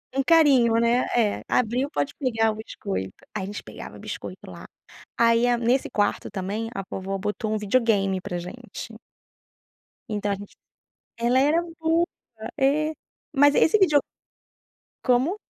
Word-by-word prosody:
Um 275 Hz, -, +3 dB
carinho, 275 Hz, -8 st, +5 dB
né? 235 Hz, +2 st, +2 dB
É, 220 Hz, -4 st, +1 dB
abriu, 250 Hz, +4 st, +1 dB
pode 290 Hz, -2 st, -2 dB
pegar 225 Hz, -5 st, +1 dB
o -, -, -6 dB
biscoito. 195 Hz, -, -5 dB, 0.2 s
Aí -, -, -1 dB
a -, -, -3 dB
gente 205 Hz, +1 st, -6 dB
pegava -, -, -10 dB
biscoito -, -, -7 dB
lá, -, -, -10 dB, 0.5 s
aí 230 Hz, +1 st, +4 dB
a 240 Hz, 0 st, +3 dB
nesse 240 Hz, +3 st, +1 dB
quarto 205 Hz, -1 st, 0 dB
também 205 Hz, +3 st, -3 dB
a 195 Hz, -, -3 dB
vovó 195 Hz, +1 st, -3 dB
botou 210 Hz, +2 st, -3 dB
um -, -, +1 dB
videogame 205 Hz, -3 st, +1 dB
pra 180 Hz, -2 st, -4 dB
gente. 230 Hz, +5 st, -8 dB, 1.2 s
Então 205 Hz, -1 st, -1 dB
a -, -, +1 dB
gente 200 Hz, +1 st, -12 dB, 0.6 s
Ela 240 Hz, +2 st, +2 dB
era 300 Hz, +5 st, +3 dB, 0.2 s
boa, 325 Hz, +1 st, +2 dB, 0.5 s
é. 300 Hz, +3 st, +2 dB, 0.4 s
Mas 285 Hz, 0 st, +5 dB
esse 375 Hz, -, +5 dB
video 310 Hz, -7 st, +5 dB, 1.1 s
Como? 260 Hz, +10 st, +2 dB
235 Hz, 145 wpm, -25 LUFS, 205-275 Hz, 1.2 s, carinho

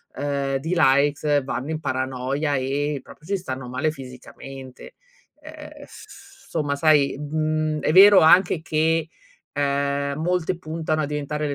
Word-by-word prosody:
ehm, 140 Hz, -1 st, -2 dB
di 160 Hz, +6 st, -3 dB
likes 145 Hz, -1 st, +2 dB
vanno 135 Hz, +2 st, -4 dB
in 155 Hz, -, -3 dB
paranoia 130 Hz, +2 st, -2 dB
e 140 Hz, +2 st, -2 dB
proprio 155 Hz, -, -16 dB
ci 200 Hz, 0 st, 0 dB
stanno 130 Hz, -7 st, -6 dB
male 140 Hz, +5 st, -1 dB
fisicamente. 135 Hz, -, -11 dB, 0.5 s
Ehm, 300 Hz, -1 st, -12 dB
s 395 Hz, 0 st, -16 dB
somma, 145 Hz, -3 st, -2 dB
sai, 145 Hz, -2 st, +3 dB
mhmm, 155 Hz, 0 st, -2 dB
è -, -, 0 dB
vero 195 Hz, +2 st, +8 dB
anche 175 Hz, +1 st, +5 dB
che, 160 Hz, +1 st, 0 dB, 0.4 s
ehm, 140 Hz, 0 st, -1 dB
molte 180 Hz, +1 st, -1 dB
puntano 155 Hz, -1 st, -3 dB
a -, -, -1 dB
diventare 150 Hz, +1 st, -3 dB
150 Hz, 135 wpm, -23 LUFS, 140-160 Hz, 0.5 s, vero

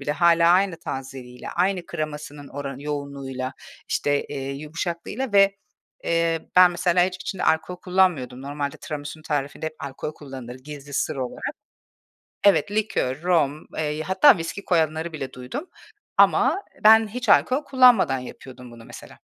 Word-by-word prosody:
bile 145 Hz, +1 st, -2 dB
hâlâ 170 Hz, 0 st, +4 dB
aynı 185 Hz, -1 st, +2 dB
tazeliğiyle, 130 Hz, -4 st, -7 dB
aynı 180 Hz, 0 st, 0 dB
kremasının 150 Hz, -3 st, -6 dB
oranı 140 Hz, -1 st, -6 dB
yoğunluğuyla, 140 Hz, -3 st, -4 dB, 0.4 s
işte, 145 Hz, 0 st, 0 dB
eee, 135 Hz, -1 st, -5 dB
yumuşaklığıyla 170 Hz, -, -4 dB
ve, 195 Hz, 0 st, +5 dB, 0.5 s
eee, 165 Hz, -1 st, +1 dB, 0.2 s
ben, 180 Hz, -1 st, +8 dB
mesela 175 Hz, 0 st, +2 dB
hiç 185 Hz, 0 st, -3 dB
içinde 190 Hz, -, -4 dB
alkol 160 Hz, +3 st, +1 dB
kullanmıyordum. 175 Hz, -9 st, +1 dB
Normalde 145 Hz, +1 st, -4 dB
tiramisunun 150 Hz, +1 st, -7 dB
tarifinde 145 Hz, 0 st, -3 dB
hep 155 Hz, -, -5 dB
alkol 140 Hz, +2 st, -6 dB
kullanılır 130 Hz, -4 st, -9 dB
gizli 145 Hz, +1 st, -10 dB
sır 155 Hz, +2 st, -1 dB
olarak. 130 Hz, -2 st, -4 dB, 0.9 s
Evet, 200 Hz, 0 st, +4 dB
likör, 205 Hz, -10 st, -1 dB
rom, 155 Hz, -4 st, +1 dB
eee, 155 Hz, 0 st, -2 dB
hatta 190 Hz, -, +5 dB
viski 180 Hz, +4 st, -5 dB
koyanları 160 Hz, -1 st, 0 dB
bile 135 Hz, -4 st, -6 dB
duydum. 125 Hz, -, -6 dB, 0.5 s
Ama 400 Hz, -, +4 dB, 0.2 s
ben 220 Hz, 0 st, +7 dB
hiç 245 Hz, +2 st, -6 dB
alkol 255 Hz, +7 st, +4 dB
kullanmadan 250 Hz, -, +5 dB
yapıyordum 125 Hz, 0 st, -11 dB
bunu 115 Hz, -1 st, -13 dB
mesela. -, -, -12 dB
155 Hz, 140 wpm, -24 LUFS, 140-180 Hz, 0.9 s, ben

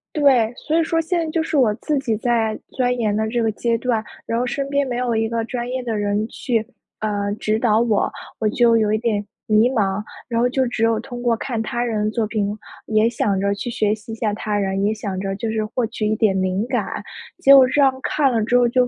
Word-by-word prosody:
对， 255 Hz, -6 st, +4 dB
所 315 Hz, +2 st, +2 dB
以 -, -, +3 dB
说 330 Hz, 0 st, 0 dB
现 340 Hz, +2 st, 0 dB
在 -, -, -4 dB
就 325 Hz, -1 st, 0 dB
是 315 Hz, -, -1 dB
我 225 Hz, -6 st, +4 dB
自 295 Hz, +4 st, -1 dB
己 235 Hz, -5 st, -1 dB
在 225 Hz, -2 st, 0 dB
钻 250 Hz, -1 st, 0 dB
研 215 Hz, -3 st, 0 dB
的 220 Hz, 0 st, 0 dB
这 235 Hz, +1 st, -1 dB
个 220 Hz, -, +1 dB
阶 230 Hz, +2 st, 0 dB
段， 230 Hz, -2 st, -1 dB, 0.2 s
然 230 Hz, +1 st, -1 dB
后 250 Hz, -, 0 dB
身 275 Hz, +2 st, -2 dB
边 280 Hz, -1 st, +1 dB
没 245 Hz, -1 st, -2 dB
有 245 Hz, -2 st, 0 dB
一 225 Hz, 0 st, 0 dB
个 230 Hz, -1 st, -1 dB
专 240 Hz, -1 st, -4 dB
业 255 Hz, 0 st, -3 dB
的 230 Hz, -3 st, -2 dB
人 205 Hz, +1 st, 0 dB
去， 230 Hz, -3 st, -2 dB, 0.3 s
呃， 205 Hz, -1 st, -1 dB
指 215 Hz, +1 st, 0 dB
导 220 Hz, -2 st, +3 dB
我， 220 Hz, -4 st, +1 dB, 0.3 s
我 220 Hz, -, +1 dB
就 230 Hz, 0 st, +4 dB
有 215 Hz, -1 st, +2 dB
一 215 Hz, -, +2 dB
点 215 Hz, -2 st, -1 dB, 0.2 s
迷 215 Hz, +3 st, +4 dB
茫， 205 Hz, -5 st, 0 dB, 0.3 s
然 230 Hz, -1 st, 0 dB
后 245 Hz, -, +3 dB
就 260 Hz, 0 st, +1 dB
只 235 Hz, -2 st, -2 dB
有 225 Hz, -1 st, +3 dB
通 245 Hz, 0 st, -7 dB
过 240 Hz, -1 st, +2 dB
看 230 Hz, -3 st, -3 dB
他 240 Hz, +2 st, -2 dB
人 215 Hz, -3 st, -1 dB
的 -, -, +1 dB
作 225 Hz, -1 st, 0 dB
品， 210 Hz, -1 st, -2 dB, 0.3 s
也 215 Hz, +1 st, +3 dB
想 200 Hz, -4 st, 0 dB
着 200 Hz, +1 st, +1 dB
去 220 Hz, +5 st, -4 dB
学 215 Hz, -3 st, +1 dB
习 220 Hz, +1 st, -8 dB
一 -, -, -4 dB
下 215 Hz, -2 st, -1 dB
他 210 Hz, 0 st, -2 dB
人， 195 Hz, 0 st, -1 dB
也 215 Hz, -, +2 dB
想 200 Hz, -3 st, -4 dB
着 195 Hz, 0 st, -3 dB
就 220 Hz, +2 st, -3 dB
是 220 Hz, -1 st, -1 dB
获 240 Hz, +2 st, -1 dB
取 215 Hz, -1 st, -3 dB
一 215 Hz, -, +1 dB
点 200 Hz, -4 st, +2 dB
灵 185 Hz, +3 st, 0 dB
感， -, -, -2 dB, 0.4 s
结 275 Hz, -, +7 dB
果 260 Hz, -2 st, +8 dB
这 285 Hz, +2 st, +2 dB
样 270 Hz, -1 st, +5 dB
看 275 Hz, -2 st, +1 dB
了 230 Hz, -, +1 dB
之 245 Hz, +2 st, +3 dB
后 245 Hz, -1 st, +4 dB
就 250 Hz, +1 st, +2 dB
230 Hz, 275 characters per minute, -21 LUFS, 215-245 Hz, 0.4 s, 果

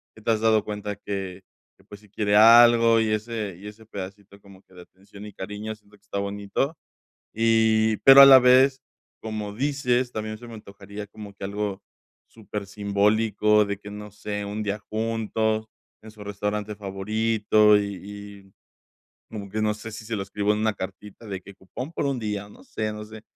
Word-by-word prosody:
que 110 Hz, -, -15 dB
te -, -, -4 dB
has 110 Hz, -, 0 dB
dado 110 Hz, -2 st, +3 dB
cuenta 105 Hz, -1 st, -5 dB
que 95 Hz, -2 st, -6 dB, 0.4 s
que, 95 Hz, -, -24 dB
pues, 100 Hz, +1 st, -13 dB
si 105 Hz, -, -21 dB
quiere 105 Hz, 0 st, 0 dB
algo 115 Hz, 0 st, +7 dB
y 110 Hz, -, 0 dB
ese 110 Hz, -3 st, -3 dB
y 105 Hz, -, -10 dB
ese 105 Hz, +2 st, -12 dB
pedacito 100 Hz, -1 st, -9 dB
como 100 Hz, -2 st, -17 dB
que -, -, -26 dB
de 90 Hz, -, -11 dB
atención 100 Hz, +3 st, -15 dB
y 105 Hz, -, -10 dB
cariño 105 Hz, +3 st, -6 dB
siento 105 Hz, -1 st, -23 dB
que 100 Hz, -, -40 dB
está 100 Hz, -1 st, -4 dB
bonito. 100 Hz, +9 st, -3 dB, 0.6 s
Y, 110 Hz, -1 st, +3 dB
pero 135 Hz, 0 st, +9 dB
a -, -, +12 dB
la 135 Hz, -1 st, +10 dB
vez, 130 Hz, +1 st, +4 dB, 0.4 s
como 110 Hz, -2 st, -5 dB
dices, 130 Hz, -2 st, 0 dB
también 110 Hz, 0 st, -4 dB
se 120 Hz, -, -12 dB
me 115 Hz, -, -10 dB
antojaría 100 Hz, 0 st, -10 dB
como 105 Hz, 0 st, -11 dB
que 100 Hz, -, -12 dB
algo 100 Hz, 0 st, -4 dB, 0.4 s
supersimbólico 105 Hz, 0 st, 0 dB
de 100 Hz, -1 st, -4 dB
que, 105 Hz, 0 st, -10 dB
no 105 Hz, 0 st, -8 dB
sé, 105 Hz, 0 st, -5 dB
un 105 Hz, +1 st, -4 dB
día 105 Hz, 0 st, -3 dB
juntos 110 Hz, 0 st, -2 dB, 0.4 s
en 110 Hz, -, -11 dB
su 105 Hz, -1 st, -12 dB
restaurante 105 Hz, +1 st, -4 dB
favorito, 105 Hz, +2 st, +2 dB
y 100 Hz, -2 st, -3 dB
y 100 Hz, -1 st, -11 dB, 0.8 s
como 100 Hz, -2 st, -7 dB
que 110 Hz, +2 st, -3 dB
no 105 Hz, -1 st, +1 dB
sé 110 Hz, +1 st, -9 dB
si, 110 Hz, -, -9 dB
se 115 Hz, +1 st, -4 dB
lo 100 Hz, -, -3 dB
escribo 100 Hz, +1 st, -1 dB
en 105 Hz, -, -2 dB
una 110 Hz, -1 st, +1 dB
cartita 100 Hz, +4 st, -9 dB
de 95 Hz, -2 st, -5 dB
que 100 Hz, +2 st, -13 dB
cupón 125 Hz, -, -8 dB
por 145 Hz, -, -2 dB
un 135 Hz, -2 st, -1 dB
día, 105 Hz, -2 st, -4 dB
no -, -, -17 dB
sé 110 Hz, -1 st, -4 dB
no 105 Hz, 0 st, -7 dB
sé, 110 Hz, 0 st, -12 dB
105 Hz, 195 wpm, -24 LUFS, 100-110 Hz, 0.8 s, a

